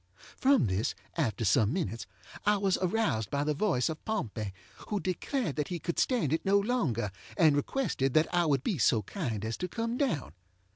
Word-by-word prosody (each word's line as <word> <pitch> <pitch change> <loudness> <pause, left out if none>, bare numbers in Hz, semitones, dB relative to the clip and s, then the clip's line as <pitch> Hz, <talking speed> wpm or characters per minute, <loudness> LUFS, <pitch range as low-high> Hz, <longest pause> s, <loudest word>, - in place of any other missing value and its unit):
From 270 - +4
this, 100 +6 -1 0.2
after 115 - 0
some 105 +3 +3
minutes, 115 - -3 0.4
I 210 0 +3
was 195 -2 +2
aroused 175 - 0
by 140 0 0
the 150 0 +1
voice 145 -6 +1
of 160 -1 -5
Pompey, 115 - -3 0.4
who 210 - -1
declared 185 - -2
that 150 - 0
he 175 - -3
could 170 +1 -3
stand 230 - +2
it 160 - 0
no 195 +1 +4
longer, 180 - 0 0.3
and 160 -6 +5
requested 145 - 0
that 155 +1 +3
I 175 -1 +3
would 140 -3 +2
be 190 -10 -1
so 110 0 +3
kind 110 - -3
as 110 0 -3
to 180 - -3
come 230 +5 -2
down. 255 - -1
160 Hz, 190 wpm, -30 LUFS, -, 0.4 s, and